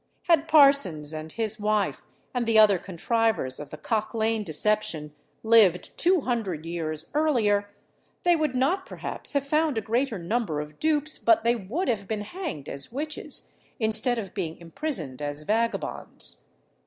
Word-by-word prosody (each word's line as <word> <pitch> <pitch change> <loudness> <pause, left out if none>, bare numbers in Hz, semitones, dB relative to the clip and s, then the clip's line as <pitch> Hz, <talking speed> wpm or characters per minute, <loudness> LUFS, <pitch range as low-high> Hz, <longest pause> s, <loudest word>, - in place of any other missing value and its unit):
Had 325 -2 +3
Parsons 275 - +5
and 155 0 -6
his 220 +1 -2
wife, 210 0 0 0.3
and 245 -2 -1
the 225 -1 +4
other 205 -4 +6
contrivers 200 - 0
of 150 - -7
the 155 - -8
Cock 215 +7 -2
Lane 220 -1 +1
deception, 160 -4 -1 0.3
lived 220 -6 +4
two 360 0 +3
hundred 205 - -2
years 165 -1 -4
earlier, 225 -10 +2 0.5
they 350 -1 +5
would 305 -5 0
not 350 +10 +1
perhaps - - -2
have 280 -1 +1
found 305 -2 +1
a - - +3
greater 230 +2 0
number 180 -3 -1
of 150 0 -7
dupes, 310 -1 +1
but 225 -1 +4
they 235 +1 +3
would 240 - -3
have 205 -5 -1
been 215 -2 -2
hanged 215 - -6
as 140 +6 -6
witches, 300 +5 -5 0.3
instead 220 +2 +1
of 200 -5 -5
being 165 -5 -3
imprisoned 165 - -5
as 145 +1 -4
vagabonds. 225 +6 -2
220 Hz, 155 wpm, -26 LUFS, 170-265 Hz, 0.5 s, other